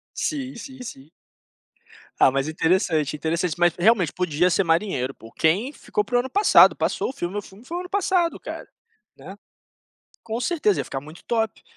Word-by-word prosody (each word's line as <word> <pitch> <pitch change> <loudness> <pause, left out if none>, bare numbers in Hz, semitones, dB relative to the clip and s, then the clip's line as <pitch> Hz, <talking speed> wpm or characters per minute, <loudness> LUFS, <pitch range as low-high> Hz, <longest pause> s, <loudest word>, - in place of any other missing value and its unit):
Sim, 275 -3 -3
sim, 260 +2 -10
sim. 150 - -10 1.1
Ah, - - +6
mas 135 +2 -1
interessante, 160 -2 +1
interessante, 165 +2 -1
mas 175 -1 +3
realmente 185 -3 +3
podia 180 0 +1
ser 195 +3 +2
marinheiro 165 -6 0
pô, 115 - -14
o - - -16
Ken 195 - +1
ficou 420 +5 -2
para 245 - 0
o - - +4
ano 260 - -3
passado, 410 +8 +6
passou - - -1
o 265 - -6
filme, 185 -5 -4
o 205 - -2
filme 200 +5 -16
foi 340 +5 -5
o - - -2
ano 360 - -9
passado, 365 -3 +1
cara, - - -8 0.5
né. - - -10 0.9
Com 225 +1 -4
certeza 215 - +1
ia - - -3
ficar 135 - -5
muito 155 +4 -13
top, 225 -3 -1
190 Hz, 190 wpm, -23 LUFS, 160-255 Hz, 1.1 s, Ah